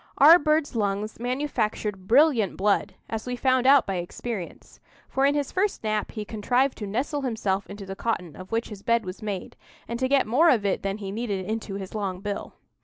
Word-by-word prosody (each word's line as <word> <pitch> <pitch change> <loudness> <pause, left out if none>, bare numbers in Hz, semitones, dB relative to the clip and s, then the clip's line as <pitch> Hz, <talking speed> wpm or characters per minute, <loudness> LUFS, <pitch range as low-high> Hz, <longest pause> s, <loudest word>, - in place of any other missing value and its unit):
Our 320 +5 +9
bird's 305 -3 +1
lungs 210 0 -1
manufactured 225 -6 -2
brilliant 250 - +4
blood, 200 -1 +1
as 225 +1 -5
we 250 - -2
found 255 0 +2
out 275 -1 +7
by 195 -2 -2
experience; 180 +2 -6 0.3
for 270 +1 +2
in 285 - +2
his 290 -2 -1
first 390 - 0
nap 215 -1 -1
he 215 -2 -5
contrived 245 +6 0
to 210 - -4
nestle 275 +8 -2
himself 210 -6 -1
into 200 0 -8
the 195 0 -6
cotton 180 -8 -3
of 185 0 -11
which 230 +1 -1
his 205 -3 -9
bed 230 -1 +1
was 185 +1 -7
made, 205 -4 -5 0.3
and 235 0 -4
to 260 0 0
get 275 -1 +4
more 280 +10 +4
of 220 -8 +3
it 195 - 0
than 195 +1 -2
he 195 -2 -6
needed 205 -3 -3
into 215 -1 -4
his 195 -1 -6
long 195 -4 -3
bill. 205 0 -5
220 Hz, 205 wpm, -26 LUFS, 200-260 Hz, 0.3 s, Our